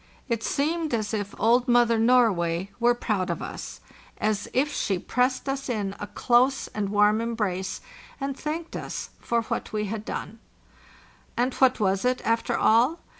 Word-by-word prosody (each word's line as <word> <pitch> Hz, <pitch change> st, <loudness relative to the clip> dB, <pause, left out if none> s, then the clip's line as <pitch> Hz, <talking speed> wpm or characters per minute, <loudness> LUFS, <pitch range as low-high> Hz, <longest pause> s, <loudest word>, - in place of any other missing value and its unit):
It 230 Hz, -3 st, -1 dB
seemed 310 Hz, +4 st, 0 dB
as 215 Hz, -2 st, -3 dB
if 205 Hz, -2 st, -3 dB
old 240 Hz, +4 st, +3 dB
Mother 240 Hz, -2 st, +4 dB
Norway 200 Hz, -7 st, +3 dB
were 240 Hz, 0 st, +4 dB
proud 200 Hz, -6 st, -1 dB
of 170 Hz, -, -2 dB
us, -, -, -7 dB, 0.4 s
as 210 Hz, -1 st, -1 dB
if 290 Hz, +3 st, +1 dB
she 195 Hz, -, 0 dB
pressed 255 Hz, +8 st, 0 dB
us 270 Hz, 0 st, -3 dB
in 205 Hz, -4 st, -2 dB
a 205 Hz, -, -5 dB
close 250 Hz, +5 st, +2 dB
and 205 Hz, -2 st, -3 dB
warm 210 Hz, +2 st, +3 dB
embrace, 205 Hz, -5 st, -2 dB, 0.4 s
and 275 Hz, -1 st, -3 dB
thanked 320 Hz, +4 st, -5 dB
us -, -, -5 dB
for 235 Hz, -1 st, 0 dB
what -, -, -4 dB
we 210 Hz, -1 st, -1 dB
had 210 Hz, +1 st, -4 dB
done. 225 Hz, +1 st, -6 dB, 1.0 s
And 250 Hz, +2 st, +1 dB
what 260 Hz, -2 st, +3 dB
was 195 Hz, -2 st, +1 dB
it, 250 Hz, 0 st, +1 dB
after 230 Hz, 0 st, +1 dB
all? 240 Hz, +9 st, +4 dB
230 Hz, 165 wpm, -26 LUFS, 205-255 Hz, 1.0 s, Mother